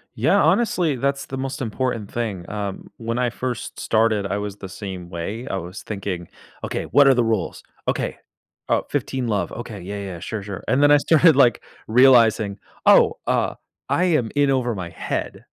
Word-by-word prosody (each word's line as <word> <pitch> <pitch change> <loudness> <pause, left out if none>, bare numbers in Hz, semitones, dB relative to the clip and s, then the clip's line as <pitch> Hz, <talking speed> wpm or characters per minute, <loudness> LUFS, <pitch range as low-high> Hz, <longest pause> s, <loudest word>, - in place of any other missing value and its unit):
Yeah, - - +3
honestly, 180 - +2
that's 140 +2 -1
the 135 - -6
most 135 0 -4
important 115 -2 -2
thing, 105 -7 -3
um. 100 -2 -5
When 115 +1 -3
I 125 -2 +1
first 125 -3 -5
started, 110 -2 +1
I 100 +1 -2
was 105 -1 -5
the 95 - -8
same 95 -3 -7
way, 100 +9 -5
I 95 - -2
was 90 +3 -7
thinking, 95 -4 -5 0.4
"Okay. - - -3
What 140 -1 +5
are 135 - +6
the 120 - +3
rules? 110 -6 -2 0.2
Okay. - - -1 0.5
Oh, - - +2
15 130 -2 -2
love. 100 -6 -1
Okay, 110 -5 -7
yeah, 100 +3 -6
yeah, 100 - -5
yeah, 85 - -8
sure, 105 +3 -5
sure." 100 -2 -7
And 130 +5 +3
then 145 - +6
I 145 - +8
started, 160 +1 +5
like, 125 -5 +4 0.2
realizing, 115 -4 +5 0.3
"Oh, - - +6
uh, - - 0 0.3
I 180 - +2
am 155 -11 +1
in 145 -1 +3
over 125 -3 0
my 90 -3 -5
head." - - -4
115 Hz, 190 wpm, -22 LUFS, 100-130 Hz, 0.5 s, I